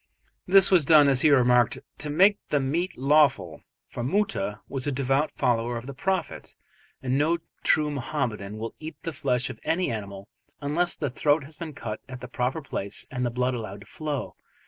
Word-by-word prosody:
This 195 +1 +6
was 180 -4 +6
done, 150 0 +6
as 135 -2 +3
he 155 - +5
remarked, 125 -4 +4 0.2
"to 150 - -3
make 195 +7 +4
the 145 - +2
meat 160 +7 -2
lawful," 135 - +2 0.3
for - - -6
Moota 120 - -1
was 135 0 -2
a - - +1
devout 135 +3 0
follower 120 0 0
of 115 - -7
the 140 - -7
Prophet, 190 +7 -3 0.5
and 130 +1 0
no 160 +4 +2 0.3
true 150 -1 +3
Mohammedan 120 -7 -3
will 115 +1 -5
eat 155 +1 -7
the 165 - -4
flesh 125 -2 0
of - - -12
any 175 -1 0
animal 100 -3 -6 0.3
unless 160 +5 0
the 145 -5 -3
throat 145 +3 +2
has 150 +3 -9
been 160 -2 -7
cut 110 -5 -6
at 130 -1 -7
the 125 - -8
proper 125 +5 -2
place 100 -7 -3
and 125 -1 -2
the 120 - +1
blood 125 +2 -1
allowed 110 -4 -6
to - - -13
flow. 150 +3 -5
135 Hz, 190 wpm, -26 LUFS, 120-155 Hz, 0.5 s, This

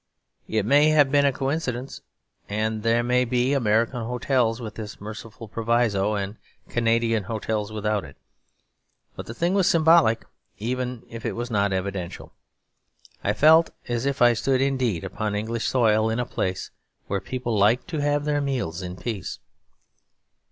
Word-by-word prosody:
It 110 -2 0
may 145 +6 +5
have 145 -3 +4
been 145 0 +4
a - - +3
coincidence, 135 -2 -3 0.5
and 110 +1 -1
there 115 +2 +2
may 125 +1 +2
be 125 +2 +1
American 115 -1 +1
hotels 125 -1 0
with 110 -3 -6
this 105 -2 -8
merciful 110 +2 -9
proviso 110 -2 +1
and 100 +1 -4 0.3
Canadian 115 -2 +1
hotels 110 -1 -3
without 105 -1 -1
it; - - -12 1.0
but - - -8
the 115 - -7
thing 170 +6 0
was 195 -3 +3
symbolic 160 -8 +4 0.3
even 125 +2 -3
if 115 -1 -9
it 115 - -2
was 120 +3 -5
not 100 -2 +1
evidential. 95 -2 -4 0.9
I 105 - +1
felt 160 +8 +6 0.2
as 120 +2 -1
if 140 -3 +1
I 120 0 +6
stood 130 +3 +1
indeed 130 -9 0
upon 105 -1 -3
English 110 +2 -2
soil, 110 -3 +3
in 110 +2 -1
a 125 - 0
place 95 -4 -3 0.3
where 100 -1 -2
people 120 +1 -3
liked 110 +5 +3
to 160 -3 -2
have 145 0 +1
their 145 -1 +1
meals 125 -11 -2
in 90 -1 -6
peace. 100 -2 -5
115 Hz, 160 wpm, -24 LUFS, 105-130 Hz, 1.0 s, felt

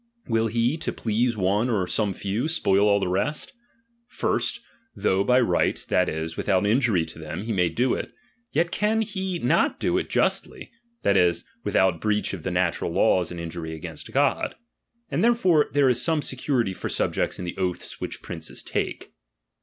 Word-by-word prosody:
Will 115 -1 +2
he, 115 +6 +1
to 160 - -3
please 115 +1 0
one 100 +5 +1
or 100 -6 +1
some 105 +2 0
few, 100 +8 -2
spoil 105 - +3
all 100 0 +4
the 95 - -1
rest? 100 +12 -2 0.5
First, - - -1 0.4
though 95 +1 +1
by 125 +4 +4
right, 120 - +2
that 90 0 +3
is, 80 +1 -4
without 95 -1 +1
injury 110 -6 +3
to 80 0 -10
them, 80 +4 -5
he 115 0 -2
may 90 -3 +2
do 120 +9 +1
it, - - -4 0.4
yet 170 +3 +1
can 220 +1 +1
he 190 -4 -3
not - - +1
do - - +1
it - - -5
justly, - - -1 0.3
that 100 -1 +3
is, 85 -2 +3 0.2
without 95 -3 +2
breach 105 -1 0
of 95 - -5
the 95 - -3
natural 90 -1 0
laws 90 -1 +3
and 85 - -7
injury 80 -1 -5
against 80 - -8
God. - - +1 0.6
And - - +1
therefore 205 -10 +4
there 145 -1 +4
is 125 -1 +2
some 160 -1 +1
security 125 -6 -1
for - - -5
subjects - - -1
in 90 - -5
the 85 - -5
oaths 90 -2 -3
which - - -5
princes - - -7
take. - - -3
105 Hz, 180 wpm, -25 LUFS, 90-130 Hz, 0.6 s, all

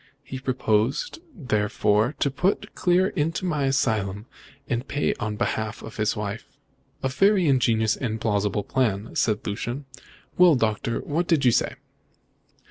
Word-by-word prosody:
He 130 - -7
proposed, 125 - 0
therefore, 110 - +1
to 140 - +2
put 185 +8 -1
Clear 180 +2 +2
into 165 +5 -1
my 150 -6 0
asylum, 110 -6 0 0.4
and 120 +2 -2
pay 145 - 0
on 105 0 -2
behalf 110 0 -2
of 110 - -9
the 110 -1 +1
wife." 105 +1 -4 0.6
"A - - +2
very 195 +6 +3
ingenious 115 -5 +2
and 110 -3 -3
plausible 105 -2 0
plan," 110 -3 -1
said 110 -1 +1
Lucian. 120 +7 -4 0.5
"Well, 180 -4 +7
Doctor, 115 -1 0
and - - -14
what 165 +4 -1
did 155 -6 +2
you 125 - +6
say?" - - +1
120 Hz, 145 wpm, -25 LUFS, 105-145 Hz, 0.6 s, Well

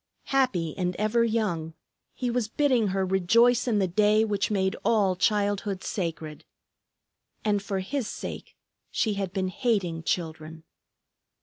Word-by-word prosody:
Happy 195 - +1
and 180 -1 -1
ever 215 +3 +2
young, 190 -9 -1 0.4
he 245 -2 -2
was 240 -2 0
bidding 250 -3 +2
her 190 0 0
rejoice 230 +7 +3
in 225 -3 +2
the 195 -2 +2
day 210 +4 +3
which 205 -2 0
made 190 -2 0
all 200 -5 +3
childhood 205 0 0
sacred. 165 -5 -4 1.0
And 205 -1 +2
for 195 -1 -3
his 255 +4 -3
sake - - -7 0.3
she 215 - 0
had 195 -2 -3
been 190 -1 -1
hating 185 -7 -1
children! 160 -1 -4
200 Hz, 135 wpm, -27 LUFS, 180-225 Hz, 1.0 s, rejoice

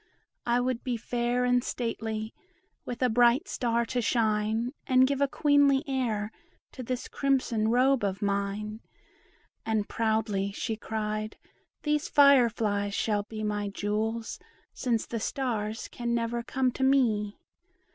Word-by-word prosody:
I 240 +1 +3
would 250 -1 -1
be 245 -2 -1
fair 240 +2 -1
and 245 0 +3
stately, 220 -3 -3 0.5
with 245 +1 -4
a - - +5
bright 245 - +4
star 235 - 0
to 245 +1 -1
shine 220 +1 0
And 255 0 +5
give 280 +1 -1
a 280 - +4
queenly 285 -1 +3
air 225 -6 -1 0.4
to 260 - -8
this 255 0 -4
crimson 255 -6 0
robe 255 +1 +3
of 195 -1 -1
mine." 205 +2 -2 0.8
And 220 -2 -1
proudly 220 -3 0
she 225 +2 -3
cried, 215 0 -4 0.5
"These 300 +2 0
fire 280 -4 +6
flies 205 -2 -1
shall 210 -2 +1
be 215 +1 -7
My 205 -1 -1
jewels, 215 +3 -2 0.3
since 235 -4 -1
the 230 - -4
stars 225 -3 -2
can 235 -1 -3
never 235 0 -1
come 255 +1 0
to 265 - -3
me." 225 -7 +2
230 Hz, 140 wpm, -28 LUFS, 215-255 Hz, 0.8 s, fire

